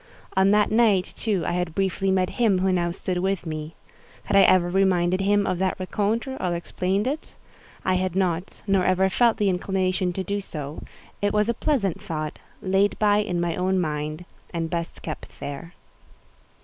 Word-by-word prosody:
On 190 +1 +4
that 210 +1 +3
night, 215 -5 +3
too, 205 -6 -1
I - - 0
had 175 -2 -2
briefly 195 0 0
met 185 -1 +2
him 210 -5 +4
who 190 +1 +2
now 175 -1 +1
stood 180 +1 -3
with 190 -1 -1
me. 155 0 -5 0.5
Had - - -1
I 195 - +8
ever 185 -2 +5
reminded 185 0 +2
him 205 +1 +2
of 185 -1 -1
that 190 -1 0
rencontre, 215 +7 -1
or 180 -2 -1
explained 185 +4 -1
it? 290 +5 -4 0.5
I 185 - +2
had 185 -1 0
not, 180 -1 -1
nor 195 -2 +2
ever 190 +1 +2
felt 235 +3 +3
the 205 - +1
inclination 185 0 0
to 190 - -3
do 200 +3 -2
so: 150 -5 -7 0.4
it 205 0 +1
was 210 +1 +2
a - - +3
pleasant 225 - 0
thought, 155 -2 -4 0.2
laid 195 +1 +2
by 205 -1 +3
in 180 -4 -1
my 170 -1 0
own 190 +1 +1
mind, 155 0 -3 0.3
and 165 -1 -3
best 170 0 -4
kept 155 - -7
there. 155 +5 -7
185 Hz, 185 wpm, -24 LUFS, 175-200 Hz, 0.5 s, I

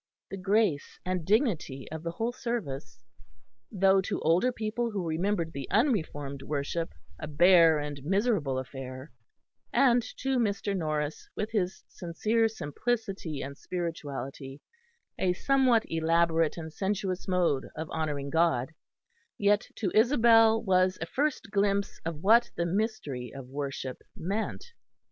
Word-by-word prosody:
The 195 - -4
grace 195 -5 +1
and 180 -2 -1
dignity 185 - 0
of 160 0 -5
the 170 0 -4
whole 225 +6 -1
service, 135 - -5 0.7
though 195 -1 +4
to - - -3
older 175 +10 +3
people 230 +1 -2
who 195 -6 -3
remembered 165 +1 -1
the 135 -2 -6
unreformed 155 - 0
worship 150 +4 -3 0.3
a 155 - -5
bare 165 +1 +6
and 145 -2 -5
miserable 190 - +1
affair, 130 +1 -7 0.6
and 245 -3 +4 0.2
to 265 -1 0
Mr. 200 -2 0
Norris, 155 -3 -2
with 215 +2 -3
his 190 -4 -1
sincere 215 +7 0
simplicity 195 - -3
and 140 +1 -6
spirituality, 145 -5 -5 0.6
a 180 -1 +2
somewhat 255 +1 +3
elaborate 165 0 +2
and 160 -2 -7
sensuous 190 -1 -2
mode 175 -7 +1
of 160 +1 -4
honouring 145 -3 -2
God, 160 -4 +2 0.6
yet 205 +1 +2
to 190 -5 -2
Isabel 225 -1 +5
was 185 -2 +3
a 165 - -3
first 270 - -1
glimpse 200 0 +1
of 165 -1 -5
what 230 +4 +5
the 170 - 0
mystery 170 - -2
of 135 -2 -9
worship 135 -2 -4 0.2
meant. 200 +6 -3
180 Hz, 130 wpm, -29 LUFS, 150-215 Hz, 0.7 s, bare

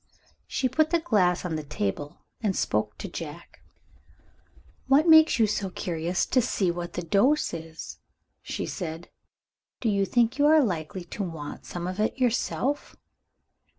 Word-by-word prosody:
She 260 - 0
put 310 +5 +2
the 340 - +3
glass 190 - +2
on 170 -3 -2
the 155 - -2
table, 145 +2 -4 0.2
and 205 -4 0
spoke - - -1
to - - -6
Jack. - - -8 1.3
"What 285 +5 +5
makes 315 -2 +7
you 225 - +5
so 205 -2 -1
curious 175 0 -2
to 255 - +2
see 190 -5 0
what 175 0 -5
the 180 - -3
dose 205 - +2
is?" 160 -1 -8 0.4
she - - -4
said. 165 -2 -6 0.7
"Do 230 - 0
you 200 -1 +1
think 240 +4 +2
you 290 - +5
are 310 -1 +6
likely 175 -3 -3
to 190 - -6
want 165 -6 -6
some 175 -1 -5
of 185 +2 -4
it 215 - 0
yourself?" 255 +2 0
195 Hz, 155 wpm, -27 LUFS, 170-255 Hz, 1.3 s, makes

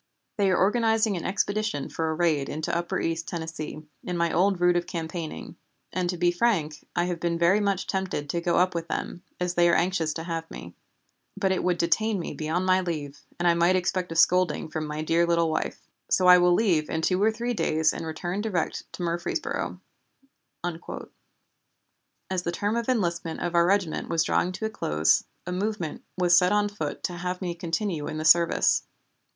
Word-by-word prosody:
"They 200 -2 +3
are 185 - +3
organizing 220 +1 +2
an 170 - -4
expedition 205 -5 -1
for 160 -1 -2
a 160 - -1
raid 155 -4 +1
into 155 +2 -2
upper 170 0 -1
East 165 0 -2
Tennessee, 160 -2 -5 0.2
in 180 -1 -3
my 170 -1 +1
old 190 +1 +2
route 175 0 +4
of 175 0 0
campaigning, 165 -1 -5 0.4
and, 180 -1 -1
to 180 - -2
be 175 0 +3
frank, 175 -6 0
I 175 - +2
have 175 -2 -3
been 170 0 -1
very 170 +4 +4
much 200 -2 0
tempted 190 -6 -2
to 170 +3 -2
go 170 0 +1
up 185 +1 +3
with 170 -1 -3
them, 175 - -4 0.2
as 180 0 -1
they 175 -1 +4
are 170 - +4
anxious 170 -3 +1
to 165 - -4
have 165 -1 -4
me. 85 0 -9 0.6
But 195 -1 +1
it 190 - 0
would 180 -1 +1
detain 210 +6 +1
me 170 - -5
beyond 160 +5 -2
my 185 0 +4
leave, 150 -5 -4 0.2
and 175 - +1
I 170 - +6
might 170 +2 +3
expect 180 -1 -1
a - - -4
scolding 170 -2 +3
from 155 0 -3
my 150 +1 -4
dear 170 +2 +2
little 170 -1 +2
wife. - - -3 0.2
So 185 - +3
I 180 0 +9
will 175 0 +4
leave 175 -9 +2
in 160 0 -2
two 185 +2 +1
or 220 +2 +4
three 235 +2 -2
days 160 -7 +1
and - - -5
return 175 +4 -3
direct 200 -7 -2
to 180 - -5
Murfreesboro." 170 0 -2 0.8
As 175 +1 -9
the 170 - -2
term 205 +5 -1
of 235 +1 -2
enlistment 170 -8 -1
of 175 0 -2
our 170 0 +4
regiment 190 -4 0
was 165 -1 +2
drawing 180 - +1
to 220 - -4
a - - 0
close, 75 - +2 0.2
a 180 - -4
movement 185 -4 -3
was 175 -1 +4
set 180 +1 +5
on 205 0 +2
foot 160 -8 -5
to 180 - -2
have 180 +1 -3
me 180 -2 -3
continue 170 -1 -2
in 155 - -4
the 155 - -3
service. 170 +1 +4
175 Hz, 200 wpm, -26 LUFS, 165-185 Hz, 0.8 s, I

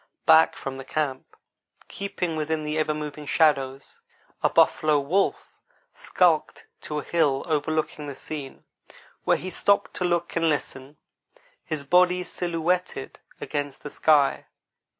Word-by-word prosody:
Back 160 0 +6
from 135 -1 -6
the 135 - -7
camp, 135 -2 -3 0.5
keeping 180 -4 -4
within 155 0 -2
the 150 0 -3
ever 155 0 0
moving 150 -1 -6
shadows, 140 -4 +1 0.4
a - - +3
buffalo 155 -1 +3
wolf 175 +8 0 0.4
skulked - - +1 0.2
to 150 - -5
a 150 - -3
hill 145 -5 +1
overlooking 155 -1 -1
the 140 - -6
scene, 140 -1 -7 0.6
where - - +3
he 185 - -6
stopped 200 +3 +1
to - - -2
look 175 -1 -1
and 165 -1 +2
listen, 140 -1 -3 0.7
his 155 -3 -4
body 180 +4 +3
silhouetted 175 +1 -2 0.2
against 145 -1 -4
the 145 - -7
sky. 145 -3 +2
155 Hz, 130 wpm, -25 LUFS, 145-170 Hz, 0.7 s, Back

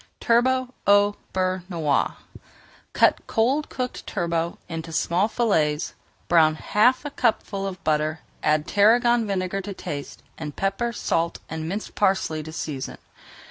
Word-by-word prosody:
TURBOT 255 +2 +2
AU 205 0 +5 0.2
BEURRE 185 -1 0
NOIR 160 -6 +1 0.8
Cut - - +4
cold 260 +7 +1
cooked 250 -1 -5
turbot 170 0 -1
into 165 0 -6
small 175 +5 +1
fillets. 160 -11 +1 0.3
Brown 160 -2 +5
half 245 - +2
a 290 - -4
cupful 215 -6 0
of 185 -2 -7
butter, 155 +1 0 0.2
add 150 0 +2
tarragon 230 +3 +4
vinegar 195 0 -1
to 195 0 -7
taste, 145 -4 -6 0.2
and 150 -2 -6
pepper, 195 +5 -1
salt, 170 -6 -1
and 160 0 -4
minced 205 +4 -4
parsley 190 -6 +1
to 160 +1 -8
season. 150 -4 -5
190 Hz, 135 wpm, -24 LUFS, 160-225 Hz, 0.8 s, AU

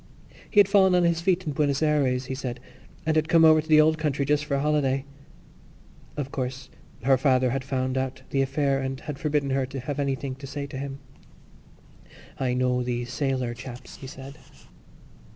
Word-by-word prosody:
He 210 - +3
had 200 - +7
fallen 190 -2 +5
on 180 - +4
his 170 -1 +2
feet 185 0 +1
in 150 - -2
Buenos 140 0 +1
Ayres, 135 -4 +1
he 130 - -4
said, 130 -2 -5 0.5
and 160 0 +1
had 155 0 +2
come 165 0 +6
over 155 -1 +6
to 155 - -16
the 155 -1 +6
old 155 +1 +4
country 145 -2 0
just 150 +1 +1
for 145 -2 -1
a - - +1
holiday. 140 -2 +1 1.1
Of 140 -2 -3
course, 130 0 -4 0.3
her 135 0 +4
father 130 -2 +3
had 135 +1 -2
found 130 -1 -1
out 130 0 -4
the 135 - +2
affair 135 0 +1
and 135 0 -3
had 145 -2 -6
forbidden 145 -2 0
her 135 -1 0
to 135 +1 -6
have 145 +3 -4
anything 140 -1 -2
to 135 0 -9
say 140 +1 -5
to 135 -1 -7
him. 140 0 -6 1.4
"I 125 -2 0
know 125 0 +1
these 120 0 -3
sailor 130 -3 -1
chaps," 120 0 -10
he 135 - -9
said. 135 +2 -10
135 Hz, 195 wpm, -26 LUFS, 130-150 Hz, 1.4 s, had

